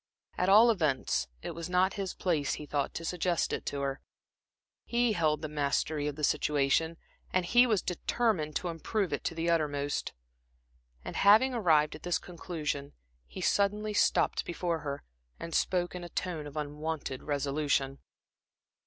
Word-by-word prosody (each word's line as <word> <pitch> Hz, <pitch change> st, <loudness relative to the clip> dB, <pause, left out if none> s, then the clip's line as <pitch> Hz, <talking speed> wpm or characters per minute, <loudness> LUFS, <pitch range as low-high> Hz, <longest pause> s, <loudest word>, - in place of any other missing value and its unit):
At 180 Hz, -, +1 dB
all 220 Hz, +4 st, +8 dB
events, 155 Hz, -, 0 dB, 0.2 s
it -, -, -4 dB
was 170 Hz, +1 st, -6 dB
not 185 Hz, +1 st, +3 dB
his 195 Hz, -3 st, -4 dB
place, 160 Hz, -6 st, 0 dB
he 150 Hz, -, -8 dB
thought, 145 Hz, -1 st, -2 dB
to 165 Hz, -, -4 dB
suggest 175 Hz, 0 st, 0 dB
it -, -, -4 dB
to 140 Hz, -, -2 dB
her. 140 Hz, 0 st, -2 dB, 0.8 s
He 240 Hz, -1 st, +1 dB
held 155 Hz, -4 st, +1 dB
the -, -, -1 dB
mastery 150 Hz, 0 st, -1 dB
of 145 Hz, -, -3 dB
the 150 Hz, -, -7 dB
situation, 150 Hz, +3 st, +2 dB, 0.3 s
and 185 Hz, -1 st, +1 dB
he 245 Hz, +7 st, +5 dB
was 215 Hz, -6 st, +1 dB
determined 180 Hz, -4 st, 0 dB
to 180 Hz, -, -1 dB
improve 185 Hz, +4 st, -2 dB
it -, -, -2 dB
to 165 Hz, -, -2 dB
the 165 Hz, +1 st, -2 dB
uttermost. 145 Hz, -3 st, -1 dB, 0.9 s
And -, -, -6 dB
having 220 Hz, +6 st, +6 dB
arrived 160 Hz, -10 st, +3 dB
at -, -, -10 dB
this 175 Hz, -1 st, 0 dB
conclusion, 155 Hz, -5 st, -5 dB, 0.3 s
he -, -, -8 dB
suddenly 210 Hz, +1 st, +1 dB
stopped -, -, +2 dB
before 170 Hz, -1 st, -2 dB
her 140 Hz, -2 st, -5 dB, 0.4 s
and 165 Hz, -, -6 dB
spoke 175 Hz, +1 st, +1 dB
in 180 Hz, -1 st, -6 dB
a 175 Hz, -, -7 dB
tone 165 Hz, -6 st, -3 dB
of 145 Hz, +1 st, -9 dB
unwonted 150 Hz, -2 st, -4 dB
resolution. 140 Hz, -1 st, -1 dB
165 Hz, 160 wpm, -30 LUFS, 145-185 Hz, 0.9 s, all